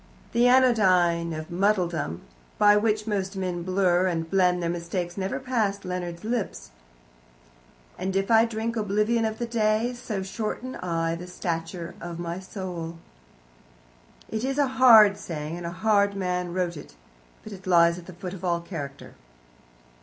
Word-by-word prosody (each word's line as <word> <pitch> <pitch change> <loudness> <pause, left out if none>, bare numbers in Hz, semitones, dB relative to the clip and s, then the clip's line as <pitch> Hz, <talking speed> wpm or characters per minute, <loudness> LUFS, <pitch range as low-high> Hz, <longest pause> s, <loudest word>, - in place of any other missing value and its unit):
The 240 +1 +4
anodyne 185 -10 +4
of 155 +2 -6
muddledom, 175 - 0 0.4
by 205 0 +6
which 210 0 +1
most 195 -2 -2
men 180 -2 -3
blur 185 0 +2
and 165 -2 -2
blend 180 -1 +2
their 170 - 0
mistakes, 175 +1 -4
never 190 -1 -2
passed 220 -6 -1
Leonard's 175 -2 -4
lips 215 - -3 1.3
And 190 +1 -2
if 195 +3 0
I 225 0 +6
drink 230 0 -3
oblivion 215 +2 +1
of 220 0 -3
a 240 - -1
day, 225 +1 +1
So 220 -5 -4
shorten 220 +6 -4
I 165 -2 -1
the 175 +2 -7
stature 170 -1 -4
of 170 -1 -6
my 170 +1 -4
soul. 180 -4 -6 1.3
It 220 +1 -4
is 270 +1 -1
a 290 - +4
hard 235 -6 +7
saying, 155 -1 -5
and 175 -1 -5
a - - -4
hard 200 +2 +2
man 180 -2 -2
wrote 175 -2 -2
it, 145 - -12 0.5
but 215 - -9
it 190 -1 -11
lies 170 -1 +4
at 170 - -14
the 185 - -9
foot 180 +1 -7
of 190 -1 -9
all 170 -2 +1
character. 145 -6 -8
185 Hz, 160 wpm, -26 LUFS, 170-215 Hz, 1.3 s, hard